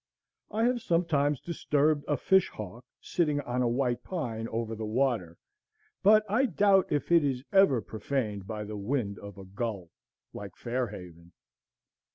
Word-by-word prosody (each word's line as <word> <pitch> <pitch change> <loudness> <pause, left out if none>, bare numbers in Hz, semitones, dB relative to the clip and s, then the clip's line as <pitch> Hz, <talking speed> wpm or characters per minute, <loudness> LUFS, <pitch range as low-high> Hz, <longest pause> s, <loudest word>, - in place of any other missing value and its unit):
I 220 +2 -1
have 245 0 +2
sometimes 155 - +1
disturbed 150 -3 +1
a 145 - +1
fishhawk 120 - 0 0.2
sitting 150 -4 0
on 125 -2 -2
a 125 - +2
white 120 0 0
pine 115 -11 -4
over 115 0 -3
the 110 0 -5
water; 110 -7 0 0.6
but 215 +2 +6
I 235 +7 +2
doubt 195 -1 +3
if 145 +3 -1
it 170 -2 +6
is 130 -3 -1
ever 190 - +5
profaned 110 -3 -3
by 105 -1 -4
the 105 0 -6
wing 100 -1 -2
of 100 0 -10
a 95 - -9
gull, 100 -3 -5 0.4
like - - -8
Fair 125 +1 -2
Haven. 85 -3 -11
125 Hz, 155 wpm, -29 LUFS, 105-165 Hz, 0.6 s, but